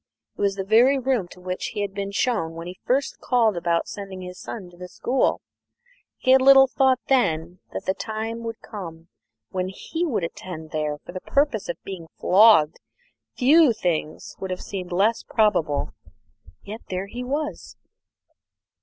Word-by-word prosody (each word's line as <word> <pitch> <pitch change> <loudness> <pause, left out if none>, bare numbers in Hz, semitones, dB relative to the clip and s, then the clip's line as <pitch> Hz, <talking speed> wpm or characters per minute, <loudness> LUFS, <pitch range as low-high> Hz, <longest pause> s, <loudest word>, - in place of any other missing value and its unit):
It - - -8
was 200 -1 +2
the 195 - -3
very 235 +7 +5
room 255 -7 0
to 180 - -14
which 180 0 -4
he 205 - -1
had 200 -1 -3
been 200 0 -3
shown 200 -6 -1
when 165 0 -7
he 180 +1 -8
first 270 +2 0
called 230 -5 +2
about 170 -1 0
sending 195 -2 -7
his 180 0 -9
son 200 -6 -7
to - - -17
the 180 0 -8
school. 255 +8 0 0.8
He 260 - +2
had 265 0 +7
little 270 0 +8
thought 260 +1 +2
then 170 -9 +1
that - - -6
the 190 - +1
time 225 +2 -4
would 230 0 -6
come 170 -6 -9 0.4
when 185 -1 -2
he 325 - -4
would 255 - -1
attend 165 -1 -7
there 150 -1 -2
for - - -8
the 185 0 -6
purpose 275 -7 0
of 170 - -3
being 185 -4 -7
flogged; 190 -6 +5 0.6
few 290 +1 +5
things 170 -7 -3
would 190 - -5
have 185 0 -4
seemed 185 -2 -6
less 205 +6 +2
probable. 180 -10 +1 0.7
Yet 215 +3 -8
here 185 +1 -2
he 240 +5 -6
was. 295 +4 -4
200 Hz, 170 wpm, -24 LUFS, 180-245 Hz, 0.8 s, little